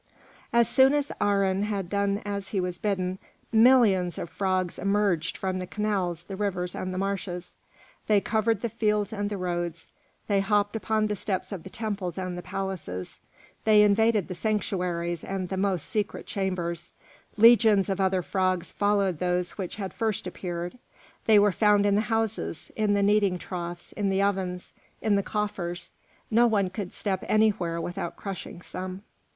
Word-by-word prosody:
As 235 Hz, -1 st, +4 dB
soon 265 Hz, +1 st, +5 dB
as 290 Hz, -1 st, 0 dB
Aharon 200 Hz, -1 st, +2 dB
had 200 Hz, -4 st, -2 dB
done 200 Hz, +2 st, 0 dB
as 200 Hz, -1 st, -3 dB
he 195 Hz, -, -1 dB
was 180 Hz, -1 st, -3 dB
bidden, 190 Hz, -2 st, -1 dB, 0.3 s
millions 220 Hz, -7 st, +5 dB
of 170 Hz, -, -5 dB
frogs 185 Hz, 0 st, -1 dB
emerged 195 Hz, -5 st, +1 dB
from 185 Hz, -1 st, -2 dB
the 185 Hz, -, -5 dB
canals, 190 Hz, -6 st, -1 dB
the 195 Hz, +2 st, -7 dB
rivers, 180 Hz, -3 st, -2 dB
and 185 Hz, -, -4 dB
the 185 Hz, -, -4 dB
marshes; 190 Hz, -2 st, -3 dB, 0.5 s
they 210 Hz, -1 st, +5 dB
covered 220 Hz, 0 st, 0 dB
the 235 Hz, -, -1 dB
fields 210 Hz, 0 st, 0 dB
and 205 Hz, -1 st, -2 dB
the 205 Hz, -, -3 dB
roads, 175 Hz, -2 st, -3 dB, 0.4 s
they 200 Hz, -2 st, +2 dB
hopped 205 Hz, +2 st, +1 dB
upon 220 Hz, -1 st, +1 dB
the 210 Hz, -1 st, -1 dB
steps 190 Hz, 0 st, -3 dB
of 195 Hz, -4 st, -5 dB
the 190 Hz, -, -10 dB
temples 200 Hz, -5 st, -4 dB
and 185 Hz, -1 st, -3 dB
the 175 Hz, -, -5 dB
palaces, 180 Hz, -, -5 dB, 0.4 s
they 210 Hz, -1 st, +6 dB
invaded 210 Hz, -1 st, +3 dB
the 185 Hz, -, -4 dB
sanctuaries 175 Hz, -3 st, -1 dB
and 190 Hz, -2 st, -3 dB
the 190 Hz, -, -2 dB
most 190 Hz, -5 st, 0 dB
secret 210 Hz, +2 st, -2 dB
chambers; 175 Hz, -3 st, -3 dB, 0.4 s
legions 220 Hz, -3 st, +6 dB
of 195 Hz, -1 st, -1 dB
other 190 Hz, -1 st, +2 dB
frogs 185 Hz, -1 st, 0 dB
followed 200 Hz, -5 st, +1 dB
those 180 Hz, 0 st, 0 dB
which 190 Hz, -4 st, -5 dB
had 195 Hz, -3 st, -5 dB
first 220 Hz, -3 st, -1 dB
appeared; 175 Hz, +4 st, -5 dB, 0.5 s
they 220 Hz, -1 st, +7 dB
were 205 Hz, 0 st, +5 dB
found 205 Hz, +1 st, +4 dB
in 200 Hz, -, +3 dB
the 205 Hz, -, +3 dB
houses, 220 Hz, -7 st, -2 dB
in 210 Hz, -2 st, +2 dB
the 200 Hz, -, +2 dB
kneading 200 Hz, -2 st, +3 dB
troughs, 175 Hz, -1 st, -6 dB
in 205 Hz, -2 st, -1 dB
the 195 Hz, 0 st, +1 dB
ovens, 190 Hz, -2 st, -1 dB, 0.3 s
in 215 Hz, -2 st, +2 dB
the 200 Hz, -, +3 dB
coffers; 180 Hz, -4 st, -3 dB, 0.4 s
no 235 Hz, +2 st, +5 dB
one 200 Hz, -5 st, +1 dB
could 185 Hz, -1 st, -5 dB
step 190 Hz, -3 st, -2 dB
anywhere 195 Hz, -6 st, +2 dB
without 175 Hz, 0 st, -4 dB
crushing 190 Hz, -3 st, -7 dB
some. 185 Hz, +1 st, -6 dB
195 Hz, 170 wpm, -27 LUFS, 180-210 Hz, 0.5 s, they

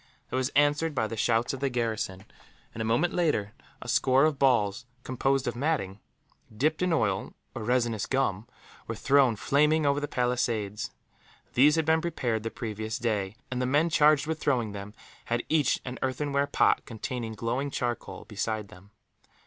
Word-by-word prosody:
It -, -, -2 dB
was 130 Hz, 0 st, +1 dB
answered 145 Hz, +2 st, +3 dB
by 110 Hz, -, +1 dB
the 115 Hz, -, -4 dB
shouts 115 Hz, +3 st, +1 dB
of 135 Hz, -, -5 dB
the 140 Hz, 0 st, 0 dB
garrison 110 Hz, -6 st, -2 dB, 0.5 s
and, 110 Hz, -, -5 dB
a -, -, 0 dB
moment 115 Hz, +10 st, +1 dB
later, 130 Hz, -, 0 dB, 0.3 s
a -, -, -11 dB
score 135 Hz, +2 st, +4 dB
of 155 Hz, -3 st, 0 dB
balls 120 Hz, -3 st, +2 dB, 0.2 s
composed 135 Hz, +1 st, 0 dB
of 120 Hz, -, -1 dB
matting, 120 Hz, -8 st, -1 dB, 0.6 s
dipped 155 Hz, +6 st, +1 dB
in 180 Hz, -1 st, +1 dB
oil 105 Hz, -12 st, 0 dB, 0.2 s
or -, -, -6 dB
resinous 115 Hz, -2 st, 0 dB
gum, 115 Hz, -5 st, 0 dB, 0.4 s
were 115 Hz, -, -3 dB
thrown 135 Hz, 0 st, +3 dB
flaming 150 Hz, +7 st, +2 dB
over 140 Hz, 0 st, +2 dB
the 145 Hz, -, -3 dB
palisades. 120 Hz, -4 st, -1 dB, 0.6 s
These 145 Hz, +5 st, +5 dB
had 160 Hz, -1 st, +1 dB
been 160 Hz, +1 st, +3 dB
prepared 125 Hz, -10 st, -1 dB
the 115 Hz, -, -3 dB
previous 110 Hz, -1 st, -4 dB
day, 105 Hz, -5 st, -1 dB, 0.2 s
and 125 Hz, 0 st, -1 dB
the 125 Hz, -, 0 dB
men 150 Hz, +5 st, +2 dB
charged 150 Hz, -1 st, +4 dB
with 160 Hz, 0 st, -3 dB
throwing 125 Hz, -8 st, 0 dB
them 100 Hz, +1 st, -8 dB, 0.3 s
had 120 Hz, 0 st, -1 dB
each 155 Hz, -3 st, +2 dB
an 125 Hz, 0 st, -6 dB
earthenware 140 Hz, +2 st, 0 dB
pot, -, -, +3 dB
containing 115 Hz, 0 st, -5 dB
glowing 120 Hz, +6 st, -2 dB
charcoal, 120 Hz, -3 st, -4 dB
beside 105 Hz, 0 st, -3 dB
them. 95 Hz, +3 st, -15 dB
125 Hz, 175 wpm, -28 LUFS, 110-145 Hz, 0.6 s, These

